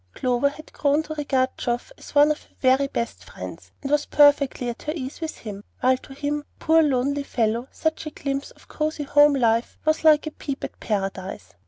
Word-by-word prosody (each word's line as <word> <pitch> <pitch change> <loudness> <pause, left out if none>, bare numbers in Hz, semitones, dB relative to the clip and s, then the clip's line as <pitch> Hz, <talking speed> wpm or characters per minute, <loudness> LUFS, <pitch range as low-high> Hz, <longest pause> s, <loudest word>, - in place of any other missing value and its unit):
Clover 250 +2 +2
had 310 +2 -13
grown 290 +2 +2
to 310 - -6
regard 270 -4 0
Geoff 240 - -2
as - - -14
one 290 +1 +7
of 305 - -3
her - - -25
very 265 +1 +4
best 235 -3 -4
friends, - - -9
and 275 - -3
was 295 0 +2
perfectly 285 -3 +4
at 235 -1 -4
her 305 - -3
ease 270 +1 -6
with 320 -1 -4
him, 205 -2 -8 0.2
while 255 +1 +3
to 270 +1 -13
him, 290 +1 -2
poor 325 0 +4
lonely 280 -1 +1
fellow, 235 -2 -1
such 320 0 -2
a - - -2
glimpse 275 -1 -3
of - - -20
cosey 305 -1 -2
home 290 0 +5
life 230 -2 +1
was 310 0 +2
like 310 -1 +6
a 310 - -4
peep 280 -2 -6
at - - -6
Paradise. 195 - -3
280 Hz, 205 wpm, -24 LUFS, 250-295 Hz, 0.2 s, one